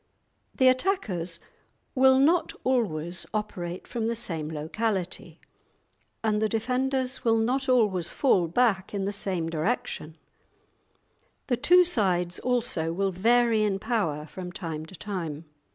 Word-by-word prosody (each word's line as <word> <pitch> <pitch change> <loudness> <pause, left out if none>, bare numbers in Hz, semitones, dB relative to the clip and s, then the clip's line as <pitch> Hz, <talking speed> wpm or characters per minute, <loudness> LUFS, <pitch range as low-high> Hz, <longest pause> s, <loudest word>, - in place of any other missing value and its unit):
The 260 - +4
attackers 245 - 0 0.5
will 265 0 +5
not 325 +6 +3
always 180 -10 -1
operate 180 -4 -4
from 225 -2 -2
the 230 - 0
same 165 -9 -4
locality, 185 +5 -3 0.8
and 215 -1 +1
the 220 - +2
defenders 255 +3 -1
will 225 -1 +3
not 260 +4 0
always 205 -9 +2
fall 190 - +2
back 195 +1 +1
in 195 -1 -1
the 200 - -1
same 190 -5 -2
direction; 165 -2 -3 1.3
the 245 - 0
two 355 +8 +6
sides, 180 - 0
also, 235 -10 0
will 195 +3 0
vary 230 +4 +3
in 205 -2 +1
power 195 -10 -1
from 180 +3 -8
time 160 -4 -6
to 190 - -10
time. 170 -6 -5
210 Hz, 130 wpm, -27 LUFS, 175-245 Hz, 1.3 s, two